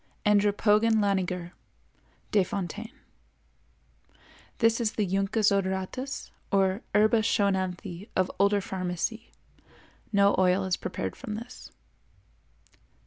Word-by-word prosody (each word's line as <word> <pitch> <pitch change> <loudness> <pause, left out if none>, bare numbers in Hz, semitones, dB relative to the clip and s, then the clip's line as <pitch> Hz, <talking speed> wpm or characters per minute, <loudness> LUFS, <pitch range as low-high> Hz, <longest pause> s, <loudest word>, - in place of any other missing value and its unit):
Andropogon 210 +2 +3
laniger 185 -4 0 0.8
Desf.—This 215 +3 -4
is 220 -2 0
the 210 - 0
Juncus 195 +3 +1
odoratus 195 +7 -2 0.2
or 195 +1 +2
Herba 215 +2 +5
Schoenanthi 190 -3 -1
of 185 0 +1
older 200 +1 +3
pharmacy. 190 +4 -3 0.8
No 200 -1 +4
oil 185 +1 +3
is 185 -2 0
prepared 185 - -4
from 215 -6 -6
this. 235 +3 -9
200 Hz, 85 wpm, -27 LUFS, 190-215 Hz, 0.8 s, Herba